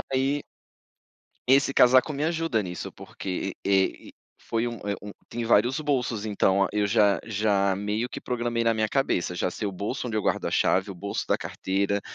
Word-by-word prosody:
Aí 135 +2 +1 1.1
esse 135 +1 +5
casaco 130 +4 +5
me 145 +1 -1
ajuda 165 -8 0
nisso, 90 -3 -6
porque, 95 0 -5
eh 95 -1 +1
eh - - -14 0.4
foi 115 0 +1
um, 120 - -4
eh, 100 - 0
um 105 - -7 0.2
tem 120 0 -4
vários 120 +5 +3
bolsos. 125 -7 -1
Então 100 -2 +2
eu 105 -1 +2
já 100 -1 +3
já 100 -2 +1
meio 105 +4 -2
que - - -6
programei 120 -1 -1
na 115 - +4
minha 110 -1 0
cabeça: 120 -10 0
"Já 90 - -1
sei 105 - -5
o - - -3
bolso 105 +8 -4
onde 115 - -4
eu 105 - -2
a - - 0
chave, 95 +2 +2
o 95 - -9
bolso 100 +3 -4
da - - +2
carteira, 100 +1 -1
110 Hz, 190 wpm, -26 LUFS, 100-125 Hz, 1.1 s, esse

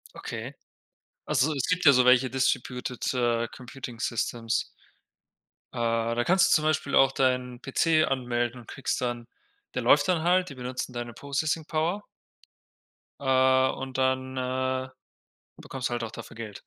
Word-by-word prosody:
Okay. - - -6 0.7
Also, 145 +5 +2
es 135 -3 -2
gibt 180 0 +1
ja 140 - +9
so 125 -1 +4
welche 125 0 +5
distributed, 125 -1 -1
äh, 120 -2 +1
Computing 125 -1 -9
Systems. 115 -1 -1 1.1
Äh, 115 0 0
da 120 - +1
kannst 190 +1 +4
du - - +7
zum 155 - +2
Beispiel 155 -2 0
auch 135 0 +6
deinen 125 -2 0
PC 155 +3 +2
anmelden 120 -2 -2
und 115 - -18
kriegst 135 - -3
dann 120 -1 -2 0.5
der - - -2
läuft 145 0 +5
dann 170 -3 +1
halt, 180 +1 +3
die 140 - -9
benutzen 125 0 -5
deine 120 -1 -5
Processing 145 +5 -2
Power. 170 +6 -1 1.2
Äh, 130 -1 +4
und 130 -1 -6
dann, 130 0 0
äh, 130 0 -1 0.7
bekommst 130 -1 -4
du - - -8
halt 120 - -2
auch 115 - -6
dafür - - -10
Geld. 110 -3 -8
130 Hz, 155 wpm, -27 LUFS, 120-140 Hz, 1.2 s, ja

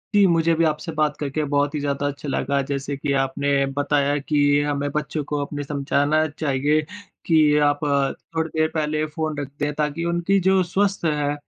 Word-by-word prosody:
जी, 205 -1 +6
मुझे 165 -1 +3
भी 165 - +2
आपसे 155 +1 -2
बात 155 -1 0
करके 150 +1 -2
बहुत 145 +1 +1
ही - - -1
ज़्यादा 145 0 -1
अच्छा 145 0 -5
लगा। 140 0 0
जैसे 140 0 -2
कि 140 0 -2
आपने 140 +1 +1
बताया 145 0 +1
कि 145 +1 -1 0.2
हमें 145 -1 -1
बच्चों 150 0 -2
को 150 +1 -3
अपने 145 0 -4
समझाना 145 +2 +1
चाहिए 145 +1 +1 0.4
कि 155 -3 +4
आप 145 0 +1 0.6
थोड़ी 160 0 0
देर 155 - +4
पहले 155 -1 0
फ़ोन 155 -1 -4
रख 145 - -3
दें, 145 0 -1
ताकि 150 +2 -2
उनकी 175 +3 +1
जो 190 -1 +4
स्वस्थ 195 +1 0
है 150 -2 0
150 Hz, 185 wpm, -22 LUFS, 145-155 Hz, 0.6 s, जी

